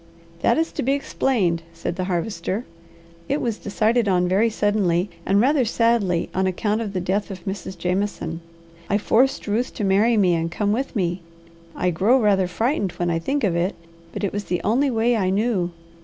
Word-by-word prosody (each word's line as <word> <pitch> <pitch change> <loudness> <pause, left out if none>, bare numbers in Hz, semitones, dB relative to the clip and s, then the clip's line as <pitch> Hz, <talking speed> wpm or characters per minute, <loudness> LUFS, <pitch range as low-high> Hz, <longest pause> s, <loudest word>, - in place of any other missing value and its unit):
"That - - +3
is 325 +1 0
to - - -3
be 270 +3 +1
explained," 225 -11 0
said 165 +1 -4
the 185 0 -2
Harvester. 185 +4 -2 0.6
"It 285 - +1
was 230 -3 -2
decided 220 +3 +1
on 180 -2 +2
very 200 +6 +3
suddenly, 205 -4 +1 0.2
and 195 +1 +4
rather 270 +4 +3
sadly, 230 -6 +1
on 190 +1 +1
account 210 +4 0
of 210 -3 -4
the 185 - -1
death 190 +3 -1
of 190 -3 -8
Mrs. 190 -2 -5
Jameson. 180 -2 -2 0.5
I 205 - +3
forced 245 +5 +2
Ruth 225 +4 -1
to 215 - -3
marry 205 +4 +3
me 185 -4 +4
and 165 0 0
come 205 +4 -1
with 260 +5 -2
me. 180 -3 -1 0.5
I 180 - 0
grow 210 +10 +3
rather 200 -5 +3
frightened 215 - -1
when 175 -1 -1
I 165 - 0
think 275 +11 -1
of 185 -5 +1
it, 175 +4 0 0.4
but - - -6
it 200 - -1
was 205 0 -3
the 180 - -1
only 255 +7 +2
way 235 0 +2
I 190 -4 +1
knew. 195 -3 +1
205 Hz, 195 wpm, -22 LUFS, 180-230 Hz, 0.6 s, and